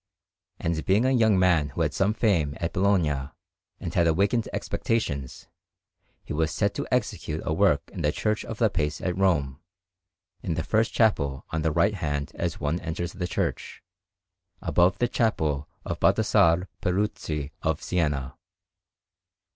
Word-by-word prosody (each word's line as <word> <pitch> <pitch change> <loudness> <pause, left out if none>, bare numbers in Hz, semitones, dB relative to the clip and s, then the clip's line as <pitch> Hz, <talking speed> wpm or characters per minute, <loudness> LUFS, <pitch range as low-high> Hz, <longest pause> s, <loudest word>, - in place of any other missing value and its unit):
And 80 -1 -1
being 105 +6 +3
a 130 - +3
young 110 -6 +4
man 85 -6 +3
who - - -4
had - - +1
some 100 +3 +1
fame 85 -11 +1
at 85 0 -2
Bologna 80 -8 +1 0.5
and - - -5
had 85 - +3
awakened 100 +8 +1
expectations, 70 - -2 0.8
he - - -6
was 80 +1 +1
set - - 0
to - - -4
execute 80 0 -1
a 80 - 0
work 85 -3 +3
in - - -5
the 75 - +2
Church 105 +5 -1
of 115 - -6
the 110 -2 +2
Pace 75 -2 -1
at 90 -2 -2
Rome, 80 -8 +1 0.8
in 80 - -2
the 80 - -1
first 110 +1 +1
chapel 70 - +1
on 80 - -1
the 80 0 +1
right 85 +7 +2
hand 75 -6 -3
as - - -3
one 75 +4 -1
enters 85 0 -4
the 90 -1 -3
church, - - -3 0.8
above 90 +2 +2
the 120 - +2
chapel 80 -12 0 0.2
of - - -4
Baldassarre 85 +3 +3
Peruzzi 90 -6 -2
of 80 -2 0
Siena. 75 -7 -1
85 Hz, 155 wpm, -26 LUFS, 75-100 Hz, 0.8 s, young